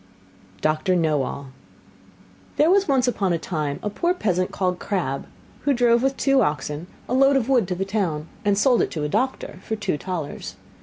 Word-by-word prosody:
DOCTOR 155 Hz, +4 st, +1 dB
KNOWALL 145 Hz, -4 st, -1 dB, 1.0 s
There 315 Hz, +4 st, +4 dB
was 395 Hz, +1 st, +4 dB
once 265 Hz, -3 st, +2 dB
upon 200 Hz, -7 st, +1 dB
a -, -, +1 dB
time 155 Hz, -4 st, -3 dB
a 210 Hz, -, -1 dB
poor 345 Hz, -, 0 dB
peasant 185 Hz, -, 0 dB
called 180 Hz, -2 st, -1 dB
Crabb, 150 Hz, -9 st, -2 dB, 0.3 s
who 285 Hz, -1 st, +1 dB
drove 235 Hz, -1 st, +4 dB
with 270 Hz, +1 st, 0 dB
two 275 Hz, -1 st, +3 dB
oxen 150 Hz, +2 st, -2 dB, 0.2 s
a -, -, -2 dB
load 275 Hz, +2 st, +5 dB
of 255 Hz, -4 st, +1 dB
wood 250 Hz, -8 st, +3 dB
to 180 Hz, -, -2 dB
the 190 Hz, +2 st, -2 dB
town, 180 Hz, -7 st, -2 dB, 0.2 s
and 205 Hz, -1 st, +2 dB
sold 245 Hz, +2 st, +4 dB
it -, -, 0 dB
to 155 Hz, -, -4 dB
a 150 Hz, -, -1 dB
doctor 260 Hz, -, -2 dB
for 220 Hz, -, -3 dB
two 210 Hz, -8 st, -2 dB
talers. 150 Hz, -, -5 dB
190 Hz, 190 wpm, -23 LUFS, 155-250 Hz, 1.0 s, load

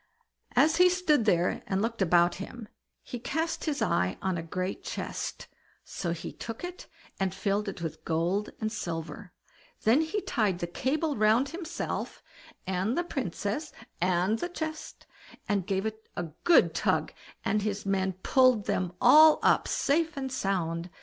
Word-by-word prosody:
As 320 Hz, +1 st, +4 dB
he 360 Hz, +1 st, +7 dB
stood 325 Hz, -9 st, +2 dB
there 175 Hz, -4 st, +2 dB
and 190 Hz, -, 0 dB
looked 230 Hz, +1 st, -2 dB
about 175 Hz, -1 st, +4 dB
him, 230 Hz, +2 st, -8 dB, 0.4 s
he 245 Hz, -, -6 dB
cast 320 Hz, +7 st, -2 dB
his 300 Hz, -3 st, 0 dB
eye 90 Hz, +1 st, +1 dB
on 190 Hz, -1 st, -1 dB
a 170 Hz, -, -2 dB
great 185 Hz, +3 st, -4 dB
chest, -, -, -5 dB, 0.4 s
so 170 Hz, -, -4 dB
he 170 Hz, -, -5 dB
took 225 Hz, +5 st, -7 dB
it 355 Hz, 0 st, -7 dB, 0.3 s
and 190 Hz, -1 st, -1 dB
filled 200 Hz, +1 st, 0 dB
it 185 Hz, -3 st, -7 dB
with 160 Hz, -, -5 dB
gold 175 Hz, +6 st, 0 dB
and 220 Hz, -1 st, -2 dB
silver; 175 Hz, -1 st, -5 dB, 0.5 s
then 235 Hz, +8 st, +5 dB
he 320 Hz, +6 st, -1 dB
tied 210 Hz, -, 0 dB
the 175 Hz, -, -3 dB
cable 285 Hz, -, -1 dB
round 220 Hz, +5 st, +3 dB
himself 335 Hz, 0 st, -5 dB, 0.4 s
and 190 Hz, -, -1 dB
the 345 Hz, -, +2 dB
Princess 250 Hz, -, -3 dB, 0.3 s
and 185 Hz, +4 st, +2 dB
the 350 Hz, -, -3 dB
chest, 315 Hz, -2 st, -6 dB, 0.4 s
and 200 Hz, -3 st, 0 dB
gave 195 Hz, 0 st, 0 dB
it 220 Hz, 0 st, -6 dB
a 175 Hz, -, -1 dB, 0.2 s
good 345 Hz, -, +6 dB
tug, -, -, 0 dB, 0.3 s
and 215 Hz, -, +1 dB
his 205 Hz, 0 st, -3 dB
men 190 Hz, -1 st, 0 dB
pulled 255 Hz, -6 st, +4 dB
them 180 Hz, -1 st, -1 dB
all 305 Hz, +5 st, +8 dB
up, -, -, +4 dB
safe 315 Hz, +1 st, +1 dB
and 265 Hz, -1 st, -3 dB
sound. 175 Hz, -6 st, -1 dB
215 Hz, 160 wpm, -29 LUFS, 185-290 Hz, 0.5 s, all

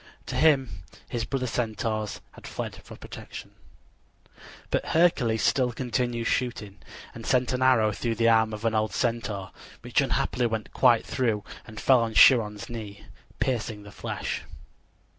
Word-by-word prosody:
To -, -, -5 dB
him 135 Hz, -, +3 dB, 0.3 s
his 115 Hz, -1 st, -3 dB
brother 135 Hz, -2 st, -2 dB
Centaurs 110 Hz, -3 st, -2 dB
had -, -, -12 dB
fled -, -, -5 dB
for -, -, -11 dB
protection. -, -, -10 dB, 1.2 s
But -, -, +1 dB
Hercules 135 Hz, -10 st, +2 dB
still 125 Hz, -2 st, +2 dB
continued 120 Hz, -1 st, -2 dB
shooting, 110 Hz, -7 st, -2 dB, 0.3 s
and -, -, -9 dB
sent 125 Hz, 0 st, +1 dB
an 125 Hz, -, -1 dB
arrow 120 Hz, -5 st, +4 dB
through 115 Hz, +2 st, -2 dB
the 115 Hz, +1 st, +2 dB
arm 110 Hz, -1 st, +4 dB
of 110 Hz, +1 st, -6 dB
an 115 Hz, -, +2 dB
old 110 Hz, -1 st, 0 dB
Centaur, 110 Hz, -6 st, -2 dB, 0.3 s
which -, -, +1 dB
unhappily 125 Hz, -1 st, 0 dB
went 110 Hz, -2 st, -4 dB
quite 120 Hz, -3 st, +4 dB
through 110 Hz, -5 st, -1 dB, 0.2 s
and 110 Hz, 0 st, -9 dB
fell 130 Hz, -2 st, +5 dB
on 115 Hz, -1 st, -2 dB
Chiron's 105 Hz, -5 st, +5 dB
knee, 105 Hz, -4 st, -8 dB, 0.3 s
piercing 110 Hz, -4 st, -2 dB
the 100 Hz, -, -12 dB
flesh. -, -, -4 dB
115 Hz, 150 wpm, -26 LUFS, 110-125 Hz, 1.2 s, fell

